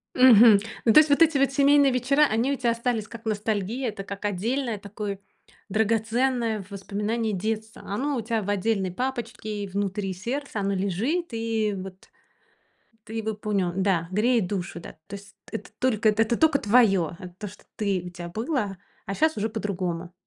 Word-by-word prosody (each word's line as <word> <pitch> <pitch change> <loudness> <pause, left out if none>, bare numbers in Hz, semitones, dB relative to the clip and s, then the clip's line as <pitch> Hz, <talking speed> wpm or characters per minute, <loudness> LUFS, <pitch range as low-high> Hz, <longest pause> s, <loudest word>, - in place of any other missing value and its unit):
Мгм. 230 -4 +8 0.3
Ну 225 - +5
то 305 - +9
есть 310 - +3
вот 285 +3 +4
эти 315 -3 +4
вот 275 0 +2
семейные 280 0 +5
вечера, 275 +4 +3
они 230 +6 +1
у - - 0
тя 240 -3 +1
остались 230 -2 -1
как 230 0 -10
ностальгия. 215 +3 -1
Это 200 -2 -6
как 200 +1 -8
отдельное 225 +4 -1
такое, 200 0 -6 0.5
драгоценное 225 +1 0
воспоминание 210 +3 -2
детства. 220 +3 -4
Оно 265 +8 -2
у - - -1
тя 225 -1 -1
в 205 - -3
отдельной 195 -2 0
папочке, 225 -4 -4
внутри 195 0 -2
сердца, 235 +4 -4
оно 200 0 0
лежит 220 - -1
и 225 -2 -1
вот 190 0 -9 1.0
ты 220 - -11
его 220 -1 -2
пунё 200 -4 -1
да, 185 -4 +1
греет 215 -1 +2
душу, 180 -3 -4
да. - - -10
То 200 - -9
есть 200 0 -15 0.2
это - - -6
только, 225 -4 +2
это 225 +2 +2
тока 315 -3 +4
твоё, 200 -7 +3
это 180 -1 -9
то, 210 - -5
что 185 - -16
ты, 200 -4 0
у 180 - -7
тя 175 0 -8
было, 215 - -2 0.3
а 195 - -3
щас 315 +5 +2
уже 215 +2 -1
по-другому. 185 -5 -3
215 Hz, 175 wpm, -25 LUFS, 200-240 Hz, 1.0 s, то